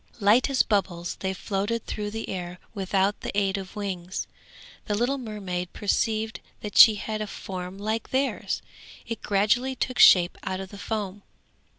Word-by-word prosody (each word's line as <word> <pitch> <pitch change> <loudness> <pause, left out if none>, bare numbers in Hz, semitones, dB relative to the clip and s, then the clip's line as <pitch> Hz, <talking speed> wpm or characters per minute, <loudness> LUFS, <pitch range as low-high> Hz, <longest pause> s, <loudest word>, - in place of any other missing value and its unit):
Light 215 +6 +4
as 270 -2 +4
bubbles 175 -5 -1
they 190 - -1
floated 200 +4 -2
through 210 -1 -3
the 225 +1 -5
air 180 -1 -5 0.2
without 195 0 0
the - - -3
aid 195 -1 +1
of 190 -1 -9
wings. 190 -3 -4 0.6
The 210 - 0
little 250 +6 0
mermaid 190 -6 -4
perceived 220 +1 0 0.2
that 210 -2 -6
she 220 - +10
had 215 +1 -4
a 215 - -2
form 185 -1 -6
like 215 +2 -2
theirs; 270 +1 -1 0.4
it 230 - -5
gradually 215 +6 +2
took 255 0 -2
shape 175 -1 +7
out 190 -1 -3
of 190 -1 -6
the 200 - -10
foam. 205 -3 -3
205 Hz, 165 wpm, -26 LUFS, 190-220 Hz, 0.6 s, she